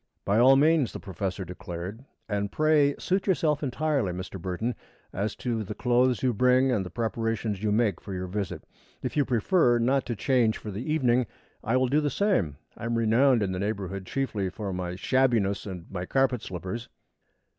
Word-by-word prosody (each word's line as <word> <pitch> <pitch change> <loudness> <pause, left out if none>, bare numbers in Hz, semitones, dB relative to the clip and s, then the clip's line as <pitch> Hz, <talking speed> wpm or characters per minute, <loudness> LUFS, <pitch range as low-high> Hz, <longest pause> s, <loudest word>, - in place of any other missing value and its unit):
"By 100 +3 +3
all 130 +3 +7
means," 150 -1 +3
the - - -6
professor 95 0 -4
declared. 90 +5 -7 0.2
"And 100 -2 -2
pray 150 -2 +3
suit 190 +2 -1
yourself 155 -6 +2
entirely, 140 -5 0
Mr. 90 +1 -6
Burton, 95 +7 -2 0.4
as 100 +2 -2
to 115 -3 -2
the 95 - -6
clothes 125 0 +2
you 125 -2 +2
bring 125 +3 +4
and 105 -6 +1
the 90 - -7
preparations 115 -2 -2
you 105 -1 0
make 105 -5 +1
for - - -9
your 95 -1 -3
visit. 100 +1 -4 0.4
If - - -3
you 145 -2 +3
prefer 125 - +3
not 130 +3 +1
to 120 - -2
change 120 -1 +2
for 105 - -7
the 110 +10 -4
evening, 125 -5 +2 0.4
I 115 +4 +1
will 130 0 +2
do 145 +4 +2
the 150 - 0
same. 125 - +1 0.2
I - - -7
am 115 0 0
renowned 115 +1 +4
in 95 - -1
the 90 - -3
neighborhood 100 -2 -3
chiefly 115 -8 -1
for 100 0 -5
my 90 -1 -3
shabbiness 115 -4 +1
and 90 -4 -7
my 90 -1 -4
carpet 135 -3 +1
slippers." 95 +6 -6
115 Hz, 190 wpm, -27 LUFS, 95-130 Hz, 0.4 s, all